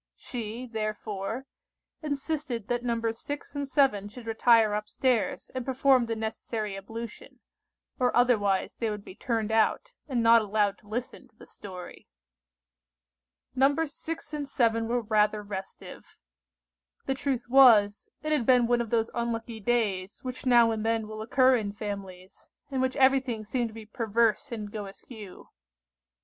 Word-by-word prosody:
She, 235 0 -6
therefore, 215 0 -4 0.6
insisted 285 -6 -3
that 240 0 -1
Nos. 230 -2 -1
6 290 0 -6
and 285 -1 -2
7 260 -8 +2
should 235 +2 -11
retire 225 -1 +4
up 210 0 -3
stairs 250 -5 0
and 255 -1 -3
perform 260 -1 +3
the 225 - -2
necessary 220 -1 -4
ablution, 225 +3 -8 0.6
or 250 -1 +2
otherwise 205 -6 +2
they 230 - -1
would 210 -1 -5
be - - -10
turned 225 0 -2
out, 225 - +1
and 250 -5 0
not 230 0 +7
allowed 205 -1 0
to 210 - -22
listen 235 +4 -5
to - - -35
the - - -14
story. 185 -3 -10 1.5
Nos. 285 +3 +2
6 320 -1 -6
and 290 -2 -4
7 230 -4 +1
were 240 +1 0
rather 210 -1 +1
restive. 195 -2 -9 0.9
The 270 - 0
truth 265 -2 -2
was, 230 -6 +6
it 310 - -2
had 290 -7 +1
been 250 -2 +5
one 240 0 +2
of 235 - -4
those 225 0 +1
unlucky 235 -1 -3
days 205 -4 -1
which 255 0 -5
now 235 -2 +6
and 220 -1 -2
then 225 -1 0
will 215 0 -7
occur 255 +3 +4
in 205 -3 -3
families, 195 -3 -8 0.2
in 265 -1 0
which 260 0 0
everything 260 -5 +2
seemed 235 +2 -1
to - - -14
be 225 -1 -9
perverse 230 +3 0
and 210 -3 -5
go 210 -2 -5
askew. 200 0 -11
230 Hz, 155 wpm, -28 LUFS, 210-255 Hz, 1.5 s, not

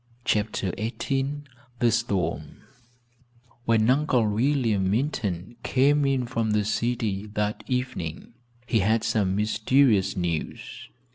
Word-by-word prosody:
CHAPTER 105 -4 0
XVIII 135 +5 -2 0.3
THE 120 -1 +3
STORM 95 -3 -2 1.0
When 115 -1 +3
Uncle 130 -3 +3
William 110 -3 +1
Minturn 110 - -2
came 145 +2 +3
in 135 -2 +1
from 115 -3 -1
the 105 -1 +1
city 110 -2 -1
that 105 0 -1
evening 125 -9 -3 0.3
he 115 -2 +1
had 110 +3 +2
some 95 -4 +1
mysterious 110 -1 +2
news. 85 -3 -4
110 Hz, 110 wpm, -25 LUFS, 105-130 Hz, 1.0 s, THE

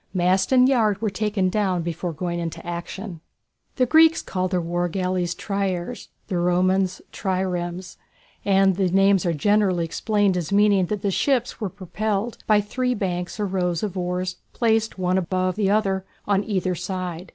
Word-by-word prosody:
Mast 185 +4 +2
and 255 -1 +6
yard 220 -7 +2
were 215 -2 -1
taken 205 -1 0
down 185 -3 0
before 170 +1 -3
going 170 +2 -3
into 165 -1 -5
action. 175 +1 -6 0.5
The 255 - +3
Greeks 320 +4 +5
called 185 -1 -2
their 180 -1 0
war 175 +1 -1
galleys 180 -1 -1
triêres, 195 +1 -3 0.2
the 180 - -1
Romans 185 +1 +1
triremes, 180 -2 -3 0.5
and 195 -2 +3
these 190 -3 +1
names 195 -1 +4
are - - +2
generally 185 +1 +2
explained 205 +2 +1
as 175 +1 -3
meaning 200 -2 +4
that 210 0 -3
the 200 - +1
ships 250 +3 0
were 210 - -1
propelled 205 +4 -3
by 210 -1 +5
three 250 +4 -1
banks 180 -2 -3
or 210 - 0
rows 180 -3 -1
of 200 -3 -3
oars 180 0 -2 0.2
placed 225 -2 +1
one 185 0 +1
above 185 0 -1
the 205 -2 +1
other 195 -2 +1 0.2
on 200 -1 +2
either 185 -4 -1
side. 180 0 -5
190 Hz, 165 wpm, -23 LUFS, 180-205 Hz, 0.5 s, and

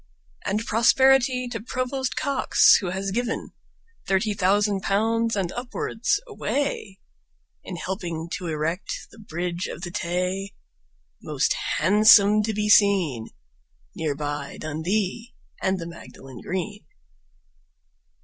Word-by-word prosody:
And 210 +3 -1
prosperity 255 +2 +4
to 230 -3 -5
Provost 255 +2 -3
Cox, 280 -1 +4
who 185 - -3
has 190 +2 -3
given 240 +4 -2 0.6
Thirty 200 +2 +1
thousand 200 +1 +2
pounds 225 +3 +1
and 190 -3 -1
upwards 245 - -2
away 275 - -3 0.7
In 185 - -7
helping 170 -2 -4
to 180 -3 -4
erect 160 +4 -3
the 225 - -16
Bridge 175 -2 -4
of 180 - -8
the 175 - -5
Tay, 185 +2 -2 0.7
Most - - 0 0.2
handsome 210 +3 +6
to 215 +1 -1
be 210 0 -1
seen, 190 - +4 0.7
Near 155 -3 -2
by 145 -1 -4
Dundee 190 - -2 0.3
and 190 0 +1
the 170 - -6
Magdalen 135 -6 -11
Green. 205 +3 -4
200 Hz, 115 wpm, -24 LUFS, 175-225 Hz, 0.7 s, handsome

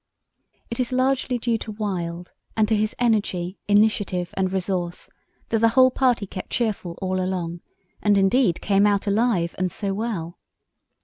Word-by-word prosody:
It 235 - -4
is 250 0 0
largely 255 0 +1
due 230 -1 0
to 215 - -6
Wild, 180 -5 -4 0.2
and 215 -1 +3
to 220 - +2
his 215 +1 0
energy, 205 -6 0
initiative, 205 -4 +2
and 190 -1 0
resource, 180 -2 -2 0.4
that 225 - +1
the 230 - +5
whole 255 +2 +5
party 245 -5 +2
kept 185 -1 -7
cheerful 205 -7 -2
all 185 0 0
along, 175 -2 -3 0.4
and, 205 -1 +3
indeed, 195 -1 +3
came 200 0 +3
out 205 -1 +1
alive 200 -5 +1
and 185 -1 0
so 200 +1 -2
well. 195 -6 -4
205 Hz, 160 wpm, -23 LUFS, 185-225 Hz, 0.4 s, the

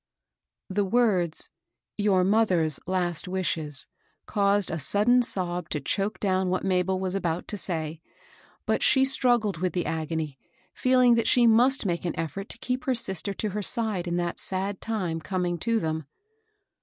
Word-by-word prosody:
The 200 +2 0
words, 195 -6 +1 0.2
" - - -59
your 200 -3 +3
mother's 185 -7 +2
last 180 -1 0
wishes," 160 -6 -2 0.4
caused 200 -2 +1
18 - - -3
MABEL - - -1
ROSS. - - -3
a - - 0
sudden 240 +5 +4
sob 180 -7 -1
to 150 - -2
choke 195 +9 -2
down 190 -2 +1
what 185 0 -1
Mabel 185 0 +1
was 185 -1 -2
about 175 -3 -2
to - - -3
say; 160 -3 -2 0.6
but - - 0
she 265 -1 +5
struggled 240 -7 +2
with 180 +2 -1
the 175 - -1
agony, 160 -3 -3 0.3
feeling 255 -1 +4
that 230 -1 +1
she 245 -1 +5
must 240 +3 +4
make 170 -3 -1
an 175 - -2
eflTort 165 +5 -4
to - - -6
keep 250 +4 -3
her 260 -3 +1
sister 195 -3 -1
to 215 - -2
her 210 +2 -3
side 210 -5 0
in 175 0 -1
that 175 0 -2
sad 190 +1 -3
time 185 -8 -2
coming 180 0 -2
to 230 +5 +1
them. 160 -4 -3
190 Hz, 180 wpm, -26 LUFS, 175-220 Hz, 0.6 s, she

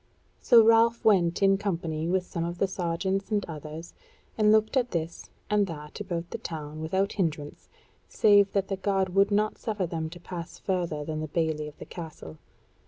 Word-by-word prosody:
So 235 -2 +7
Ralph 230 +1 +4
went 185 -4 +3
in 195 0 +4
company 165 -5 -2
with 185 +1 +1
some 170 -2 -4
of 170 +1 -4
the 195 - +1
sergeants 190 +2 -2
and 210 -2 0
others, 155 +1 -8 0.4
and 210 -1 +4
looked 220 +3 +3
at 250 -2 +2
this 165 -3 -4 0.2
and 210 -1 +2
that 150 -1 -8
about 175 -4 -4
the - - -4
town 155 -1 -6
without 190 +5 0
hindrance, 155 -6 -3 0.4
save 205 -2 +5
that 195 -1 +1
the 195 - -2
guard 195 -1 0
would 195 +1 +4
not 210 +1 0
suffer 210 -5 -2
them 160 -2 -4
to 175 +2 -11
pass 175 0 -7
further 170 -6 -2
than 155 0 -3
the 155 - -3
bailey 155 -1 -1
of 150 - -12
the - - -9
Castle. 155 - -9
180 Hz, 185 wpm, -27 LUFS, 160-200 Hz, 0.4 s, So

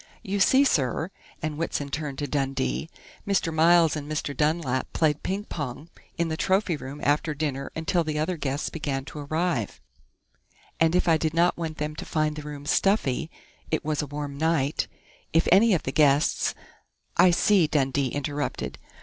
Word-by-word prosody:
You 200 +1 -2
see, 265 +7 +5
sir," 160 - +1 0.3
and 155 -1 -3
Whitson 145 -3 -2
turned 150 -2 -4
to 145 - -2
Dundee, 125 - -1 0.4
"Mr. 190 -5 +1
Miles 165 0 +5
and 150 0 -5
Mr. 150 -2 -2
Dunlap 150 -3 0
played 150 -2 +1
ping 195 +2 -2
pong 145 - -6 0.3
in 170 - +1
the 160 - -2
trophy 190 +1 +1
room 140 0 -8
after 150 +1 +1
dinner 140 -2 -3
until 165 +2 +1
the 155 -1 -3
other 160 +4 0
guests 145 -2 -2
began 140 -4 -3
to 150 - -8
arrive, 150 - -1 1.0
and 165 +1 +3
I 165 -1 +5
did 155 0 -1
not 175 +1 +3
want 160 -2 -4
them 150 0 -3
to - - -5
find 155 -1 0
the 150 - -6
room 145 -1 -8
stuffy 160 - +1 0.4
it 155 - -1
was 150 -1 0
a 150 - -4
warm 145 0 -5
night 155 -3 +1 0.5
if 165 - +3
any 215 +5 +6
of 160 - -2
the 135 - -2
guests 145 0 +3 0.3
" - - -46
"I 185 - +7
see," 180 0 +4
Dundee 140 -2 +1
interrupted. 145 +2 -3
155 Hz, 175 wpm, -26 LUFS, 140-165 Hz, 1.0 s, I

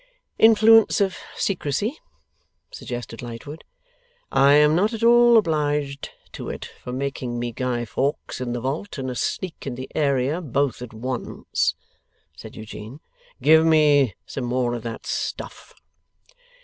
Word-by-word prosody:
'Influence 225 0 +6
of 195 -2 +1 0.2
secrecy,' 200 - -2 0.7
suggested 120 -2 -7
Lightwood. 125 +6 -8 0.7
'I 140 +1 +5
am 150 +1 +5
not 205 +6 +2
at 225 0 -4
all 240 0 +6
obliged 150 -6 0 0.2
to - - -7
it - - -6
for 125 - -10
making 130 -2 -3
me 120 0 -3
Guy 120 0 -2
Fawkes 135 +3 -3
in 120 -1 -3
the 120 - -3
vault 150 - -4
and 130 -1 -3
a - - -6
Sneak 175 +4 -3
in 130 - -3
the 130 +1 -8
area 140 +2 +1
both 140 -5 -1
at 125 - -7
once,' 125 +3 -2 0.6
said 110 +8 -11
Eugene. 110 +4 -9 0.4
'Give 160 +1 +6
me 150 - +4
some 130 - -5
more 120 0 0
of 120 - -4
that 115 0 -7
stuff. - - -5
140 Hz, 140 wpm, -23 LUFS, 120-160 Hz, 0.7 s, Influence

